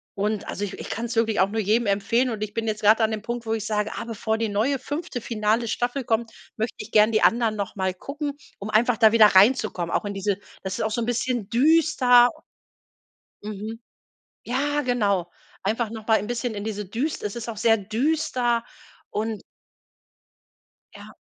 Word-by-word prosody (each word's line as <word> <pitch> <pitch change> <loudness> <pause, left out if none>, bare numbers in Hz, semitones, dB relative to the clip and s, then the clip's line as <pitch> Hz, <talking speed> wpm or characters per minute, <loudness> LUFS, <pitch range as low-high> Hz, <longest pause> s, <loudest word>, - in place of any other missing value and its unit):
und, 205 +1 -2
also, 205 - -3
i 195 - -6
ich - - -8
kann's 230 +1 -3
wirklich 225 -1 +1
auch 190 - +5
nur 220 +2 -1
jedem 220 +4 +2
empfehlen. 215 +6 +1
Und 215 -3 -3
ich 210 -1 -5
bin 225 0 -2
jetzt 215 -1 -2
grad 215 +2 +6
da 220 - +4
an 220 - -2
dem 215 -1 -3
Punkt, 235 +2 -5
wo 220 - -1
ich 220 -1 -3
sage: 210 0 -1
„Ah, - - -4
bevor 220 -1 -2
die 225 -1 -1
neue 225 +8 +1
5. 290 -2 -5
finale 220 +1 0
Staffel 245 +4 -1
kommt, 225 0 -1 0.3
möchte 220 +2 -2
ich 210 - -8
gern 215 +1 +5
die 215 - +3
anderen 230 -2 +3
noch 200 -2 -4
mal 190 -1 0
gucken, 285 - -5 0.3
um 205 +2 -6
einfach 230 +2 +3
da 220 -2 +5
wieder 220 -2 +8
reinzukommen, 200 -4 +3
auch - - 0
in 205 - -3
diese” 195 0 -1 0.3
das 190 -1 -3
ist - - 0
auch 220 - -1
so 225 - -1
'n - - -1
bisschen 240 -2 -1
düster. 260 -3 +5 1.2
Mhm. 215 +2 -6 0.6
Ja, 290 +4 0
genau. 205 -9 0 0.3
Einfach 220 +3 -1
noch 220 -1 -8
mal 220 -1 +4
ein 200 - -5
'n - - -6
bisschen 240 0 -3
in 205 0 -5
diese 210 -2 -4
düs 250 +10 -3
es 210 +2 -4
ist 235 0 -6
auch 230 - -5
sehr 225 0 +4
düster 240 +2 0 0.5
und 215 0 -3 1.5
Ja. - - -12
225 Hz, 205 wpm, -24 LUFS, 210-240 Hz, 1.5 s, wieder